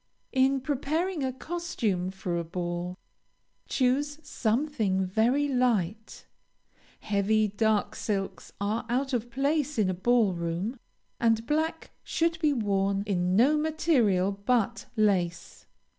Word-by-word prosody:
In 265 0 +3
preparing 305 +5 -1
a 260 - 0
costume 255 - -2
for 190 -2 -4
a - - -2
ball, 175 +1 -4 0.7
choose 285 +3 +1
something 220 -7 0
very 235 +9 +2
light. 220 -6 0 0.8
Heavy, 215 +1 +2
dark 210 0 +1
silks 195 -3 -3
are 215 +3 -2
out 265 +3 0
of 240 -1 -1
place 285 +3 0
in 200 -4 +2
a - - -2
ball 215 +2 +2
room, 175 +8 -3 0.4
and 225 -1 +2
black 315 +4 -1
should 330 0 0
be 305 -3 +3
worn 200 -5 0
in 180 -2 0
no 260 +8 +5
material 265 - +2
but 225 +3 0
lace. 190 -6 0
225 Hz, 120 wpm, -28 LUFS, 195-275 Hz, 0.8 s, no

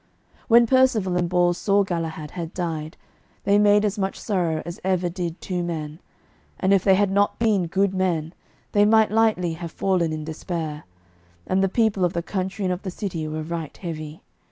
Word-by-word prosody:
When 235 0 +6
Percivale 230 -7 +3
and 175 -1 0
Bors 175 0 +2
saw 200 0 +3
Galahad 165 -4 -4
had 170 -2 -6
died, 160 -3 -4 0.5
they 200 +1 +4
made 205 0 +5
as 205 0 -1
much 195 0 -2
sorrow 175 -7 -1
as 170 0 -7
ever 185 -1 +1
did 175 -1 -4
two 180 -2 -3
men; 160 -2 -4 0.6
and 190 +1 +3
if 195 - +3
they 190 -1 +5
had 200 0 +2
not 200 +1 +2
been 210 -6 +2
good 195 +3 +1
men, 170 -4 -1 0.4
they 205 - +4
might 220 0 +4
lightly 215 -6 +2
have 165 0 -7
fallen 180 -4 0
in 155 -1 -4
despair. 160 -1 -5 0.6
And 190 +1 +1
the 195 - +2
people 215 -2 +1
of 175 0 +1
the 170 - -2
country 190 +2 -3
and 180 - +1
of 180 - -6
the 190 - -5
city 175 -4 -4
were 155 0 -4
right 165 -1 -5
heavy. 155 -3 -7
180 Hz, 190 wpm, -23 LUFS, 165-200 Hz, 0.6 s, When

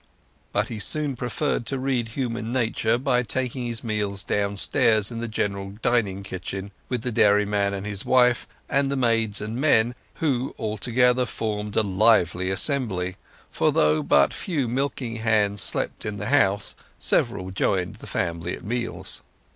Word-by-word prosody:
But - - 0
he 110 - -5
soon 145 +5 +2
preferred 125 0 -2
to 135 - -1
read 130 -3 -1
human 115 -1 -3
nature 115 -2 +1
by 125 -1 +1
taking 125 +1 -2
his 115 -1 -2
meals 105 -3 -2
downstairs 100 +2 +2
in 115 - -5
the 120 - -3
general 100 -2 -3
dining 100 -5 +1
kitchen, 95 +1 -6 0.2
with 125 -3 -2
the 125 - -2
dairyman 105 -1 +3
and 100 +1 -5
his 100 -2 -4
wife, 125 -2 +3 0.2
and 140 0 +1
the 140 - -1
maids 115 -5 +1
and 110 +2 -4
men, 120 -6 +3 0.2
who 135 -5 -1
all 110 -1 -3
together 125 +2 +2
formed 105 -2 -3
a 110 - +3
lively 95 -2 +3
assembly; 95 -5 0 0.3
for - - +2
though 75 0 +3
but 70 -1 +3
few 150 - -2
milking 125 -2 -2
hands 105 -3 +2
slept - - +1
in 105 -1 -4
the 105 +3 -4
house, 100 -8 +2 0.2
several 95 0 +1
joined 95 -1 0
the - - -11
family 85 0 -2
at - - -15
meals. 120 +2 -3
110 Hz, 160 wpm, -24 LUFS, 100-125 Hz, 0.3 s, dairyman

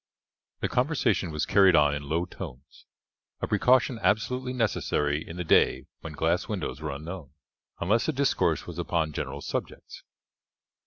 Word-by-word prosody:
The - - +1
conversation 125 - +1
was 75 -1 -2
carried 95 -3 +5
on 75 -1 +4
in 75 - -3
low 80 +5 -1
tones, 65 -4 -10 0.5
a - - -1
precaution 125 -1 +3
absolutely 125 +4 0
necessary 75 - 0
in 85 - -9
the 90 - -2
day 65 -5 +3
when 80 - -8
glass 80 +4 0
windows 105 -7 -4
were 80 - -3
unknown, 75 +1 -7 0.5
unless 105 +6 +1
the - - +2
discourse 130 - +1
was 85 -1 -7
upon 85 -2 -1
general 70 0 -4
subjects. - - -5
85 Hz, 150 wpm, -27 LUFS, 75-110 Hz, 0.5 s, carried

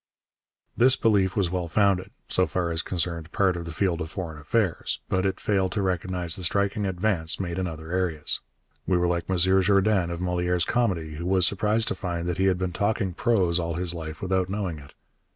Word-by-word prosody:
This 130 +2 +6
belief 100 -4 +2
was 95 -4 +1
well 90 -2 -2
founded, 95 +1 +2 0.2
so 95 - +2
far 90 -2 -1
as 80 0 -1
concerned 85 -2 -3
part 95 -2 +2
of 85 -1 -5
the 85 - -6
field 85 0 0
of 80 - -4
foreign 80 -3 -6
affairs, 95 +3 -1
but 95 +1 +1
it 95 - -3
failed 95 -2 0
to 100 -2 -1
recognize 90 -2 0
the 95 - -7
striking 100 +3 0
advance 90 -3 0
made 90 -1 -3
in 95 - -1
other 80 0 -8
areas. 85 -5 -1 0.5
We 90 - +3
were 90 - +1
like 85 0 -2
M. 95 - +1
Jourdain 95 +1 +3
of 85 -1 -4
Molière's 90 -1 0
comedy, 90 -10 -1
who 85 +2 -4
was 95 -1 +4
surprised 105 +4 +2
to - - 0
find 85 -2 -4
that 90 0 -2
he 95 - +3
had 95 -2 +3
been 90 -1 -3
talking 100 -2 0
prose 90 -5 +2
all 85 -1 -2
his 85 0 +1
life 80 -1 -7
without 95 -1 0
knowing 95 -6 -3
it. 70 -1 -15
90 Hz, 205 wpm, -25 LUFS, 85-95 Hz, 0.5 s, This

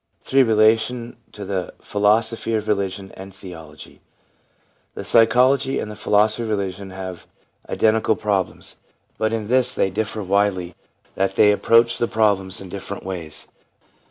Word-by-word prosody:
3. 135 +1 +3
Relation 115 +1 +2 0.2
to 105 -1 -8
the 95 -2 -4
Philosophy 110 +2 +1
of 110 0 -2
Religion 100 -2 -2
and 95 +1 -10
Theology, 90 -4 -12 0.5
— - - -41
The - - -6
psychology 130 +4 +3
and 105 - -4
the - - -8
philosophy 105 +1 +2
of 115 - -4
religion 100 -2 -3
have 95 -2 -8 0.4
identical 110 0 +2
problems, 100 -3 -3 0.4
but 110 0 +1
in 110 -2 -3
this 125 +1 +2
they 95 - +1
differ 110 +1 -3
widely, 95 -2 0 0.4
that 95 0 -1
they 105 - +6
approach 115 +3 +3
the 120 - +1
problems 100 -4 0
in 95 - -8
different 100 +1 -7
ways. 85 -5 -6
105 Hz, 145 wpm, -21 LUFS, 95-110 Hz, 0.5 s, they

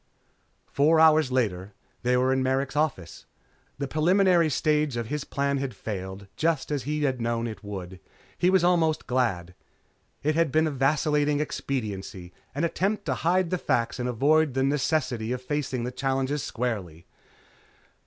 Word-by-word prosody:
Four 155 +3 +3
hours 155 -3 +5
later 100 -6 -1 0.3
they 125 +1 +2
were 130 +1 +2
in 130 - +1
Merrick's 130 +1 0
office. 135 - -2 0.5
The 140 0 -3
preliminary 175 +2 +3
stage 150 -1 +1
of 115 -2 -4
his 150 0 -2
plan 140 -1 -1
had 135 -2 -4
failed, 95 -1 -6
just 160 -3 0
as 145 -4 -2
he 150 +1 -1
had 130 -4 0
known 115 0 -1
it 110 -3 -6
would. 95 -3 -7 0.4
He 180 - +2
was 190 -1 +3
almost 170 -3 +2
glad. 105 -9 -1 0.7
It 155 +2 +2
had 165 -2 +1
been 155 +3 +3
a 155 - -1
vacillating 145 +1 +1
expediency, 100 -11 -4 0.2
an 145 - -1
attempt 195 +5 -1
to - - 0
hide 175 +1 +1
the 180 - 0
facts 120 -3 0
and 125 0 -1
avoid 145 +4 +2
the 135 - +2
necessity 135 -5 0
of 125 - -4
facing 135 -3 -2
the 125 - -3
challenge 135 +1 -1
squarely. 105 - -4
135 Hz, 160 wpm, -26 LUFS, 120-155 Hz, 0.7 s, hours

